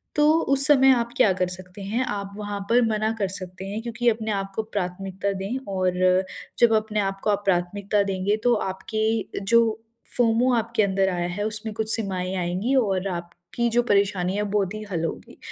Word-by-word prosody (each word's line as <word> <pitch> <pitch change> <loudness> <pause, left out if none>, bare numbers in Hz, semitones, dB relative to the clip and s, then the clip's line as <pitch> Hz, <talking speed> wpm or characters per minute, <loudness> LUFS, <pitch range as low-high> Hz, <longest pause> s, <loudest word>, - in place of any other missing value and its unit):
तो 295 - +3 0.3
उस 275 0 +5
समय 270 -3 +6
आप 235 -1 -1
क्या 215 -6 +5
कर 185 -1 -1
सकते 185 +2 -8
हैं 225 +6 -1
आप 200 -1 -4
वहाँ 205 -1 -4
पर 245 +1 +5
मना 215 0 0
कर 195 - +1
सकते 185 0 -7
हैं 205 +3 -4
क्योंकि 235 +1 0
अपने 220 -1 -2
आप 195 -1 -3
को 220 - -1
प्राथमिकता 195 -1 -3
दें 215 +7 -3 0.2
और 185 -1 0 0.6
जब 235 -2 +5
अपने 215 0 -1
आप 195 -1 -1
को - - 0
आप 205 0 0
प्राथमिकता 195 +3 0
देंगे 195 +2 -1
तो 245 - +4 0.2
आपके 220 +3 -2
जो 235 +4 +5 0.6
फोमो 245 +1 +3
आपके 230 -1 0
अंदर 190 -1 +1
आया 175 -1 -1
है 205 - -1
उसमें 215 0 -1
कुछ 220 0 +5
सीमाएँ 190 -4 -3
आएँगी 185 +9 -1
और 195 -6 +1
आपकी 175 +7 -4
जो 240 - +5
परेशानियाँ 200 0 +1
बहुत 200 -1 0
ही 215 - -6
हल 165 -3 -2
होगी। - - -7
205 Hz, 190 wpm, -24 LUFS, 190-225 Hz, 0.6 s, समय